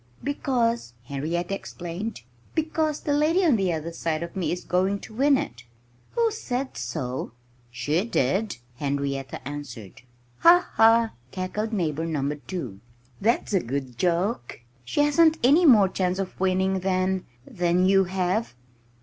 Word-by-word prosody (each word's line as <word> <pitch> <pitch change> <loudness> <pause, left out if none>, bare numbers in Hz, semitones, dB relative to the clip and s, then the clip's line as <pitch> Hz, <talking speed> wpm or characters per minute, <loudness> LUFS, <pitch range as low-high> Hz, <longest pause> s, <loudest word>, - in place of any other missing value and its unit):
"Because 235 - 0
" - - -32
Henrietta 165 +6 -2
explained 180 - -5 0.3
"because 315 -1 0
the 290 - 0
lady 320 +6 +3
on 300 -7 +5
the 190 -4 +1
other 165 0 -3
side 165 -1 -2
of 170 - -8
me 185 -3 -1
is 175 - -3
going 190 +2 +1
to 220 - -11
win 275 +4 +4
it." 120 - -5 0.5
"Who 465 -1 +2
said 265 - -3
so?" 130 -6 -4 0.4
"She 150 +8 0
did," 195 - 0 0.2
Henrietta 140 -1 -3
answered. 135 -9 -8 0.4
"Ha! 355 +1 +6
ha!" 225 0 +5 0.2
cackled 195 - -3
Neighbor 165 -6 -1
Number 145 -2 -1
2. 140 - -6 0.4
"That's 225 0 +1
a 190 - +4
good 130 -3 -4
joke. 175 - -1 0.2
She 120 - 0
hasn't 315 +2 +4
any 310 +7 +6
more 215 -8 +7
chance 185 -1 -1
of 195 -1 -4
winning 190 0 +1
than 185 0 0 0.2
than 175 +1 +1
you 195 0 +5
have!" 185 - -1
185 Hz, 145 wpm, -25 LUFS, 155-230 Hz, 0.5 s, more